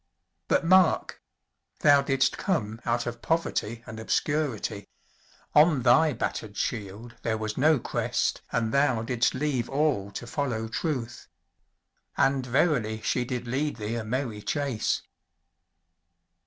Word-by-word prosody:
But - - +2
mark! 185 0 +3 0.6
thou 145 -1 +6
didst 135 -1 +1
come 115 - -1
out 120 0 0
of 120 0 -5
poverty 120 -8 -1
and 110 - -8
obscurity: 115 -4 -1 0.7
on 150 -3 +5
thy 150 +6 +5
battered 110 -4 -4
shield 105 +2 -4
there 110 -1 -1
was 110 0 -3
no 155 +3 +4
crest - - -1
and 115 -1 0
thou 135 -5 +2
didst 120 +1 +1
leave 130 -4 -1
all 135 -8 0
to 120 - -6
follow 120 -4 -2
truth. 120 -1 -3 0.9
And 135 -1 +2
verily 125 -4 +1
she 125 +2 0
did 125 -1 -4
lead 140 +5 -1
thee 110 0 -4
a 115 -1 -2
merry 115 -1 -3
chase! 140 -3 -1
125 Hz, 130 wpm, -27 LUFS, 110-145 Hz, 0.9 s, thou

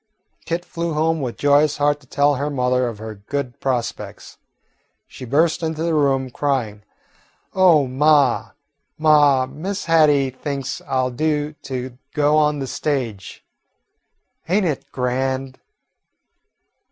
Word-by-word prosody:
Kit 170 +1 -2
flew 170 -1 -3
home 160 +1 0
with 125 -3 -4
joyous 145 +1 +3
heart 145 0 +1
to 135 - -23
tell 145 +3 +2
her 145 +2 -2
mother 125 -2 +1
of 115 -3 -5
her 110 +1 -7
good 125 +5 -5
prospects. 120 - -4 0.7
She 130 - -10
burst 155 +8 +2
into 160 -1 -2
the 170 -1 0
room, 135 -4 +1
crying, 120 -7 -2 0.7
"Oh, 175 -7 +5
ma, 140 0 +2 0.4
ma, 145 -4 +4
Miss 175 +10 -5
Hattie 150 -5 +4
thinks 135 0 -5
I 130 -1 +1
'll 130 0 -1
do 150 +3 -1 0.2
to 130 -1 -5 0.2
go 150 0 +3
on 150 -1 +3
the 135 - -3
stage. 125 - -4 1.0
Ain't 195 +2 +2
it 155 -6 -3
grand?" 130 +1 -2
140 Hz, 130 wpm, -21 LUFS, 130-155 Hz, 1.0 s, Oh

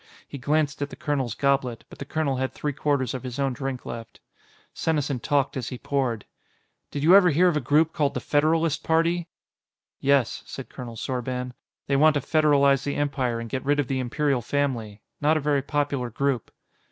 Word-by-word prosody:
He 140 - -8
glanced 145 +2 0
at 145 - -1
the - - -9
colonel's 135 -6 -2
goblet, 135 -4 0
but - - -14
the 140 - -5
colonel 140 -2 -1
had 130 0 -2
three 145 -1 -3
quarters 140 -4 0
of 130 - -4
his 125 -2 -6
own 135 -2 0
drink 135 0 -4
left. 115 -1 -8 0.5
Senesin 145 -5 -1
talked 140 +2 0
as 130 -3 -3
he 125 - -6
poured. 125 -5 -1 0.6
"Did 145 - -4
you 175 +5 +7
ever 190 -3 +7
hear 175 +4 +4
of 175 - +2
a - - +2
group 150 +5 +3
called 145 -2 0
the - - 0
Federalist 155 +1 +1
Party?" 165 +1 +1 0.7
"Yes," 140 -3 +2
said 135 - -8
Colonel 120 -3 -8
Sorban. 125 +1 -3 0.3
"They 140 - +1
want 155 +1 +5
to - - +3
federalize 140 -2 +3
the 140 0 -2
Empire 135 -5 -1
and 115 - -5
get 130 +3 -3
rid 145 +1 +1
of 145 - 0
the 135 -1 -1
Imperial 135 +1 0
Family. 120 -7 -2 0.2
Not 155 +2 +3
a - - +1
very 145 -1 +1
popular 140 -3 -1
group." 130 0 -1
140 Hz, 195 wpm, -25 LUFS, 130-150 Hz, 0.7 s, you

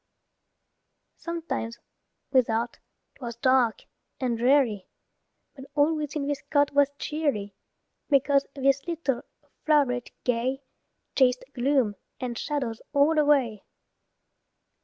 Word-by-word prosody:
Sometimes, 330 -9 -4 0.5
without, 235 -2 +1 0.3
'twas 235 -3 -7
dark 255 -2 +2 0.4
and 250 -3 0
dreary, 240 -5 +2 0.7
But 270 -2 -10
all 300 +2 +3
within 300 -1 -3
this 285 -1 -2
cot 285 -1 +3
was 285 -1 +4
cheery, 280 -11 -2 0.6
Because 280 0 +3
this 275 +2 +1
little 315 -7 -1 0.4
floweret 275 -6 +2
gay 255 +3 0 0.5
Chased 255 -2 +3
gloom 250 -5 +1 0.2
and 250 -2 -3
shadows 255 -5 -3
all 300 +3 +4
away. 270 -8 +2
270 Hz, 95 wpm, -27 LUFS, 240-290 Hz, 0.7 s, was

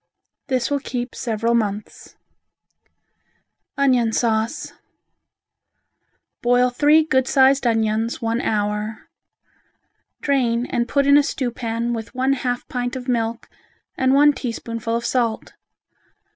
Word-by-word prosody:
This 255 -2 -1
will 285 - +1
keep 245 -2 -5
several 230 -1 -1
months. 210 -2 -3 1.6
Onion 255 -5 +3
Sauce 225 +5 -1 1.7
Boil 245 +1 +3
three 295 +5 +4
good 260 -4 +1
sized 270 -1 +4
onions, 225 0 0
one 230 0 -1
hour. 210 0 -2 1.1
Drain 245 -4 +1
and 235 -1 -1
put 280 -1 +2
in 280 +1 +6
a - - +6
stewpan 240 -3 -3
with 225 +1 -6
one 260 +1 +2
half 245 -2 -3
pint 245 0 -3
of 255 0 -6
milk 230 -2 -1 0.5
and 260 +1 +2
one 295 +1 +6
teaspoonful 230 -3 -4
of 235 0 -3
salt. 235 -3 -1
245 Hz, 115 wpm, -21 LUFS, 230-265 Hz, 1.7 s, in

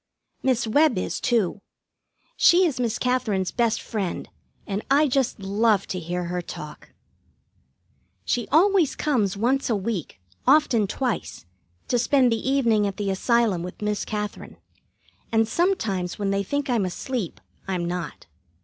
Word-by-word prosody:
Miss 255 -3 +1
Webb 280 +1 +3
is, 185 - -2
too. 215 -5 +1 0.7
She 360 +2 +5
is 290 -7 -1
Miss 235 -2 0
Katherine's 225 -8 0
best 235 -1 +1
friend, 200 -6 -4 0.4
and 200 +1 -3
I 290 +3 +4
just 260 -4 0
love 205 +1 +2
to 185 - -2
hear 175 +1 -3
her 175 +1 -3
talk. 150 -3 -9 1.4
She 240 -2 -1
always 355 -2 +3
comes 215 -10 0
once 255 +6 +1
a 230 - +2
week, 200 - -4 0.3
often 245 -9 +4
twice, 240 - -3 0.4
to 245 - +1
spend 250 +1 +3
the 230 +3 -1
evening 230 -7 +3
at 200 - -5
the 200 -2 -1
Asylum 220 -2 +1
with 180 +1 -7
Miss 210 0 -1
Katherine, 210 -1 -5 0.7
and 225 -1 +3
sometimes 220 - 0
when 200 -1 -1
they 195 0 +1
think 285 +8 -2
I'm 235 -6 +1
asleep, 200 +2 -4 0.3
I'm 180 -2 -1
not. 175 0 -5
225 Hz, 145 wpm, -24 LUFS, 195-255 Hz, 1.4 s, She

